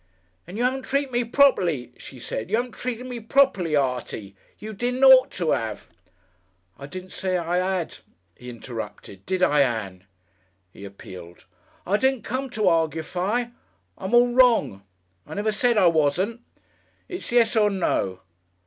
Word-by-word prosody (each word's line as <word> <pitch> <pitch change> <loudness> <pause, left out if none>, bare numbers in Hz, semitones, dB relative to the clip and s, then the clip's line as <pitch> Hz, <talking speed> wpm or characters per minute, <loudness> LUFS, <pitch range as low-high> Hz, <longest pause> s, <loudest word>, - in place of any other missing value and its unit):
"And 185 +4 -8
you 240 - 0
'aven't 260 +2 0
treated 275 0 -1
me 245 0 +1
properly," 185 - +2
she 135 - -12
said. 110 -2 -5
"You - - +2
'aven't 245 +1 -2
treated 250 0 -5
me 250 -2 -6
properly, 220 - +2
Artie. 125 -7 -2 0.2
You 215 +1 -8
didn't 250 +5 -2
ought 265 0 +8
to 170 -4 0
'ave 110 -2 -3 0.5
" 90 0 -40
"I 140 - -8
didn't 185 +4 -9
say 185 -1 -1
I 175 +1 -1
'ad," 185 -2 -2 0.4
he 125 - -11
interrupted, 110 -5 -8
"did 185 -1 0
I, 150 -4 +4
Ann?" 105 -8 -2 0.7
he 100 - -11
appealed. 95 -3 -12 0.4
"I 200 +3 +2
didn't 265 -2 +1
come 260 +3 -3
to 215 -5 -1
arguefy. 175 +8 0 0.4
I'm 190 +5 -2
all 240 0 +5
wrong. 240 - +3 0.5
I - - -8
never 210 +2 0
said 240 +2 +1
I 190 - +5
wasn't. 170 +8 +1 0.7
It's 360 -9 -7
yes 235 -1 +3
or 210 -2 +4
no. 95 - -1
185 Hz, 160 wpm, -24 LUFS, -, 0.7 s, ought